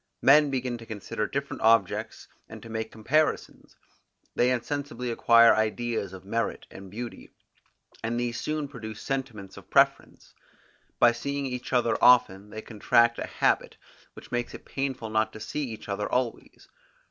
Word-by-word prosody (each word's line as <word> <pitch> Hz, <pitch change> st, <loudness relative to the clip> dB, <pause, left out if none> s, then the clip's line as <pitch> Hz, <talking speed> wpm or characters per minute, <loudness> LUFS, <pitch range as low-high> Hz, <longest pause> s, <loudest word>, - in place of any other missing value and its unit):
Men 150 Hz, +2 st, +6 dB
begin 125 Hz, -3 st, -2 dB
to 115 Hz, -, -11 dB
consider 105 Hz, 0 st, -4 dB
different 140 Hz, 0 st, -4 dB
objects, 110 Hz, -4 st, +2 dB, 0.2 s
and -, -, -10 dB
to 115 Hz, -, -10 dB
make 110 Hz, 0 st, -4 dB
comparisons; 150 Hz, +8 st, -1 dB, 0.6 s
they 125 Hz, -, +2 dB
insensibly 125 Hz, 0 st, -3 dB
acquire 115 Hz, 0 st, +6 dB
ideas 110 Hz, -2 st, -1 dB
of 95 Hz, -1 st, -11 dB
merit 115 Hz, +3 st, -2 dB
and 95 Hz, 0 st, -11 dB
beauty, 120 Hz, +4 st, -8 dB, 0.7 s
and 115 Hz, +1 st, -1 dB
these 120 Hz, -1 st, -2 dB
soon 155 Hz, -1 st, -2 dB
produce 110 Hz, -5 st, -8 dB
sentiments 120 Hz, -8 st, -5 dB
of -, -, -13 dB
preference. -, -, +1 dB, 0.6 s
By 120 Hz, -, +6 dB
seeing 140 Hz, +4 st, -3 dB
each 125 Hz, -1 st, -5 dB
other 120 Hz, -3 st, +2 dB
often 105 Hz, -5 st, +5 dB
they 110 Hz, +1 st, -8 dB
contract 115 Hz, +2 st, +2 dB
a -, -, -4 dB
habit, -, -, 0 dB, 0.4 s
which -, -, -14 dB
makes 120 Hz, -1 st, -2 dB
it -, -, -12 dB
painful 130 Hz, -5 st, -4 dB
not 110 Hz, 0 st, +1 dB
to 110 Hz, -, -9 dB
see 145 Hz, +7 st, -3 dB
each 110 Hz, -, -9 dB
other 105 Hz, +1 st, -3 dB
always. 125 Hz, -2 st, -3 dB
120 Hz, 155 wpm, -27 LUFS, 110-130 Hz, 0.7 s, Men